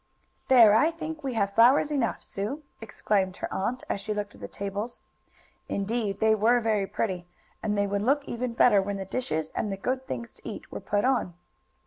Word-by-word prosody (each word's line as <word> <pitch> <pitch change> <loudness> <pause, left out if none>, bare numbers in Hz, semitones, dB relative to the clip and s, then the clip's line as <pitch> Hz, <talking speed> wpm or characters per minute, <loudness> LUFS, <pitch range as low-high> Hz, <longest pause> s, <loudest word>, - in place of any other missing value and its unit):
"There, 235 -5 +8
I 260 +9 +5
think 320 -2 -6
we 265 -3 -3
have 200 -2 0
flowers 260 +7 +5
enough, 265 -6 -1
Sue!" 220 +10 -4 0.2
exclaimed 200 -4 -1
her - - -5
aunt, 245 +6 -2
as 200 - -2
she 215 +1 -3
looked 205 0 -4
at - - -16
the - - -5
tables. 200 +4 -5 0.7
Indeed 205 -1 -1
they 220 0 +4
were 225 +3 +4
very 215 -4 0
pretty, 185 -5 -3 0.3
and 210 -2 -1
they 200 - +2
would 200 0 -1
look 280 +6 +2
even 240 0 -3
better 215 -4 +5
when 200 +1 -3
the 195 - -5
dishes, 160 -8 -2
and 210 - -2
the 195 - -3
good 260 +6 -2
things 235 0 -5
to - - -9
eat, - - -9
were - - -5
put 205 +3 0
on. 250 -10 +1
220 Hz, 200 wpm, -27 LUFS, 200-250 Hz, 0.7 s, There